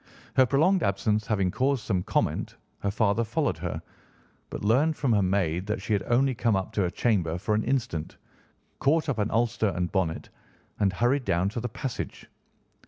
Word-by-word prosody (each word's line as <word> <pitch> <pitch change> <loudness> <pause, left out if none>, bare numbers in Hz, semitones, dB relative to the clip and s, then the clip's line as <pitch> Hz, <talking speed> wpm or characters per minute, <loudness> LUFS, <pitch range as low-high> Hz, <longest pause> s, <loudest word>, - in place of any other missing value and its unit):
Her 130 -1 +5
prolonged 165 +9 +3
absence 105 +1 0
having 100 -5 +1
caused 135 +1 0
some 95 -5 0
comment, - - -1 0.2
her 100 - -1
father 110 +2 +1
followed 115 - -1
her, 85 0 -3 0.7
but - - -5
learned 145 +9 +3
from 130 -5 +1
her 105 - +3
maid 90 -1 0
that 105 +2 -1
she 110 - -2
had 100 - +2
only 130 +3 +3
come 115 -3 +1
up 95 -1 -2
to 105 - +1
her 90 - +1
chamber 90 -6 0
for 100 +4 -1
an 110 +1 +1
instant, 115 - -2 0.6
caught 155 +3 +2
up 130 - -1
an 105 +1 +1
ulster 115 -2 +1
and 90 0 -1
bonnet, 90 -4 -1 0.5
and 100 -2 +3
hurried 125 +7 +1
down 85 +3 +1
to 120 - -4
the 120 +2 -3
passage. 130 +2 -5
110 Hz, 185 wpm, -27 LUFS, 95-125 Hz, 0.7 s, Her